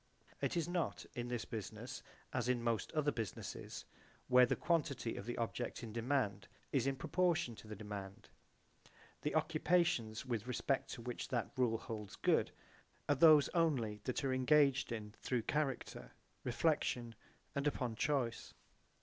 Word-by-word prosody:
It - - 0
is 165 -1 +1
not 175 -3 -1
in 120 0 -3
this 120 -2 -2
business 110 -4 -6 0.3
as - - 0
in 120 -2 +1
most 115 -4 0
other 150 -2 +2
businesses, 110 -7 -5 0.4
where 125 0 +7
the - - +1
quantity 145 -8 0
of 100 - -6
the 120 - -3
object 120 +1 -3
in 110 -2 -6
demand 115 -5 0 0.2
is 135 -2 +2
in 135 - +1
proportion 170 0 +1
to - - -12
the 105 - -6
demand. 105 0 -7 0.9
The 150 - -1
occupations 155 -7 +2
with 120 -2 -2
respect 130 +2 0
to 115 - -8
which 125 0 -4
that 120 -3 -1
rule 120 -3 +2
holds 110 -4 -6
good - - +3 0.6
are 145 - +5
those 150 0 +7
only 130 - +1
which 130 +3 -2
are 135 -1 +1
engaged 135 0 +4
in 105 -2 -5
through 125 -3 0
character, 135 - -2 0.3
reflection, 125 -3 +1 0.4
and 140 +1 0
upon 125 -5 -1
choice. 125 -3 -1
125 Hz, 150 wpm, -37 LUFS, 115-150 Hz, 0.9 s, where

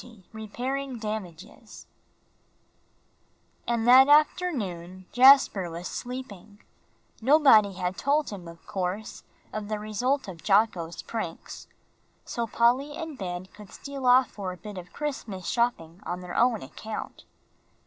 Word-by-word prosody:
XX 230 -6 -16
REPAIRING 250 +5 -4
DAMAGES 210 0 -8 1.8
And 235 -1 0
that 260 +2 +8
afternoon 210 - +1
Jasper 250 -8 +6
was 170 +2 -6
sleeping 215 -5 -8 0.6
(nobody 250 -6 +5
had 180 0 -3
told 290 0 +1
him, 185 -4 -8
of 170 0 -13
course, 190 +3 -4 0.3
of 215 -1 -4
the 215 0 -2
result 230 +6 -1
of 175 -4 -9
Jocko's 195 -5 +1
pranks), 215 -8 -6 0.6
so 235 -1 -3
Polly 250 +6 +1
and 320 -3 -6
Ben 180 -5 -5
could 205 +1 -15
steal 275 -2 -6
off 250 0 +5
for 195 -3 -5
a 180 - -9
bit 205 0 -8
of 180 0 -12
Christmas 235 -11 -5
shopping 190 -9 -1
on 180 +1 -5
their 180 -1 -8
own 240 -3 +2
account. 220 0 -8
215 Hz, 130 wpm, -27 LUFS, 185-255 Hz, 1.8 s, that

